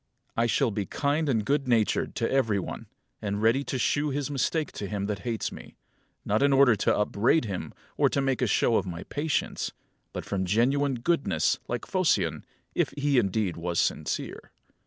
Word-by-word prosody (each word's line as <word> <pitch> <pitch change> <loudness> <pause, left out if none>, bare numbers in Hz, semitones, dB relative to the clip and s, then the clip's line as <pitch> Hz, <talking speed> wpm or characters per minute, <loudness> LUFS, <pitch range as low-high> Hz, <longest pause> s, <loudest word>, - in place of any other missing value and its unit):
I 115 +1 +2
shall 120 +1 +2
be 100 -1 -3
kind 150 +1 0
and 110 -5 +1
good 140 +1 +1
natured 115 -4 +1
to 115 - -1
every 115 -6 +2
one, 95 - -5 0.3
and 100 -1 -2
ready 115 +6 +3
to 130 - -2
shew 145 +4 +1
his 145 +1 -2
mistake 150 +2 0
to 100 - -5
him 100 0 -3
that 105 -1 -3
hates 115 +1 -3
me; - - -11 0.5
not 105 +4 +1
in 140 0 +4
order 135 -4 +6
to 105 - +1
upbraid 115 +7 +2
him, 95 -4 -4 0.3
or - - +4
to - - 0
make 135 -1 0
a 125 - +2
show 110 +2 +3
of 95 - -1
my 85 0 -5
patience, 145 -4 -2 0.4
but - - -6
from 95 -2 -1
genuine 130 +8 +2
goodness, 150 +5 +1
like 120 0 -3
Phocion, 130 - +1 0.3
if - - +1
he 140 -2 +3
indeed 100 -3 0
was 85 0 -3
sincere. - - -2
120 Hz, 185 wpm, -27 LUFS, 105-140 Hz, 0.5 s, order